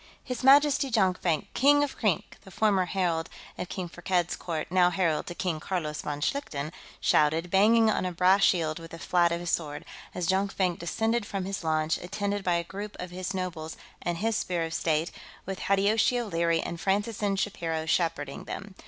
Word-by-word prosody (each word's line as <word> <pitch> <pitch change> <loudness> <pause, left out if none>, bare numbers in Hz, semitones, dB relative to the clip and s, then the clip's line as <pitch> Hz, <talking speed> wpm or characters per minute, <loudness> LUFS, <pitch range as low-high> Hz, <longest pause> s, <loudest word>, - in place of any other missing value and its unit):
"His 250 -1 -5
Majesty, 280 0 +5
Jonkvank, 185 - +1
King 290 +3 +5
of 285 - -3
Krink!" 210 -7 -1
the - - -14
former 195 -1 +2
herald 175 -3 -1 0.3
of 180 - -5
King 185 -2 -4
Firkked's 175 0 -1
court, 160 -2 -4
now 180 -1 +5
herald 175 -4 0
to 175 - -6
King 180 -5 -2
Carlos 155 -3 -3
von 145 -1 -4
Schlichten, 155 - -2 0.3
shouted, 160 +3 +2
banging 225 +4 +5
on 215 - +1
a 185 - -1
brass 185 +3 +4
shield 165 -5 +2
with 165 0 -10
the 165 - -9
flat 175 0 +2
of 170 - -1
his 175 -1 -3
sword, 150 -3 -2 0.3
as 180 - -2
Jonkvank 190 -1 0
descended 225 +7 0
from 195 -2 -4
his 195 -2 -4
launch, 155 0 +1
attended 200 +2 -3
by 180 -2 +2
a 170 - 0
group 200 +4 -7
of 180 0 -6
his 185 +1 -4
nobles 165 -4 -4 0.2
and 175 -1 -2
his 225 +4 0
Spear 175 -4 -1
of 165 0 -4
State, 160 0 0 0.3
with 190 0 -5
Hideyoshi 215 +5 +2
O'Leary 170 -7 0
and 170 -1 -5
Francis 205 +3 0
N. 200 -1 +1
Shapiro 165 -5 -2
shepherding 165 -4 -1
them. 195 0 -7
180 Hz, 190 wpm, -28 LUFS, 165-200 Hz, 0.3 s, Majesty